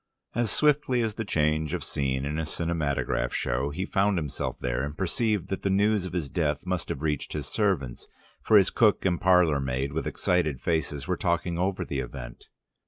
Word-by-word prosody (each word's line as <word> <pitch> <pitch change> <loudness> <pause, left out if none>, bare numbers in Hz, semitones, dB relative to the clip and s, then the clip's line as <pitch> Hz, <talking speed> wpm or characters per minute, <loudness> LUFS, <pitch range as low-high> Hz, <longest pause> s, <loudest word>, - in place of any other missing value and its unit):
As 120 -1 0
swiftly 140 -1 +2
as 110 -2 -1
the 115 - -3
change 80 -3 0
of 90 - -4
scene 65 -2 -1
in 75 +2 -2
a 80 - -1
cinematograph 75 -7 -1
show 65 +4 0
he 90 +6 -3
found 100 0 +1
himself 75 -4 -3
there, 60 +1 -1
and 75 +2 -5
perceived 105 +1 0
that 95 - -3
the 100 - 0
news 100 0 +2
of 90 - -6
his 85 -5 -1
death 75 0 -1
must 90 -3 -2
have - - -4
reached 75 -3 -1
his 75 -2 -3
servants, 90 - -1 0.3
for 110 - +5
his 95 -2 +4
cook 110 -5 +3
and 90 -2 +1
parlour 90 -5 +4
maid 65 +1 -2
with 80 - -2
excited 80 -7 0
faces, 80 -2 -1
were 90 -1 0
talking 85 -1 0
over 95 +1 0
the 70 - -3
event. - - -7
85 Hz, 195 wpm, -27 LUFS, 70-95 Hz, 0.3 s, for